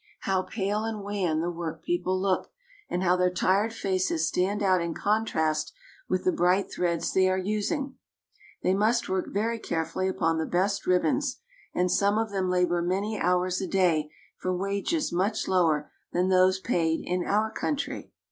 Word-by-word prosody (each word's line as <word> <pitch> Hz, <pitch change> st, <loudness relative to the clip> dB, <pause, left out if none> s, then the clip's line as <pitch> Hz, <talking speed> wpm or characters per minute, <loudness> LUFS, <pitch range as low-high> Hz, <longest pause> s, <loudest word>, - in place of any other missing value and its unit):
How 190 Hz, -1 st, +1 dB
pale 200 Hz, +2 st, -2 dB
and 220 Hz, -2 st, -4 dB
wan 190 Hz, -6 st, -1 dB
the 175 Hz, +1 st, -1 dB
workpeople 175 Hz, +2 st, -2 dB
look, 190 Hz, -1 st, 0 dB, 0.4 s
and 180 Hz, -, -1 dB
how 180 Hz, 0 st, +4 dB
their 180 Hz, 0 st, +3 dB
tired 195 Hz, +4 st, +1 dB
faces 185 Hz, -6 st, 0 dB
stand 200 Hz, +6 st, 0 dB
out 185 Hz, -2 st, +3 dB
in 170 Hz, -1 st, -3 dB
contrast 160 Hz, -8 st, 0 dB, 0.4 s
with -, -, 0 dB
the 370 Hz, -, +3 dB
bright 190 Hz, -, +2 dB
threads 170 Hz, -2 st, -1 dB
they 185 Hz, 0 st, +4 dB
are 185 Hz, -, +1 dB
using. 215 Hz, -, -2 dB, 0.7 s
They 185 Hz, -, +3 dB
must 220 Hz, +4 st, +2 dB
work 190 Hz, 0 st, -1 dB
very 225 Hz, +3 st, -1 dB
carefully 165 Hz, +1 st, -2 dB
upon 165 Hz, -3 st, 0 dB
the 160 Hz, -, -1 dB
best 195 Hz, +3 st, 0 dB
ribbons, 185 Hz, -, +1 dB, 0.4 s
and 180 Hz, 0 st, +2 dB
some 200 Hz, +1 st, +2 dB
of 220 Hz, -1 st, -1 dB
them 190 Hz, -2 st, -1 dB
labor 180 Hz, -1 st, +2 dB
many 195 Hz, +5 st, -1 dB
hours 180 Hz, +1 st, +1 dB
a 190 Hz, -, -2 dB
day 170 Hz, -5 st, +2 dB, 0.3 s
for 185 Hz, -1 st, -2 dB
wages 200 Hz, -, -1 dB
much 200 Hz, +5 st, 0 dB
lower 165 Hz, -5 st, +2 dB, 0.2 s
than 180 Hz, +2 st, +1 dB
those 185 Hz, 0 st, +4 dB
paid 165 Hz, -6 st, 0 dB
in 180 Hz, 0 st, -1 dB
our 215 Hz, +2 st, +1 dB
country. 285 Hz, +5 st, -3 dB
185 Hz, 165 wpm, -27 LUFS, 175-205 Hz, 0.7 s, how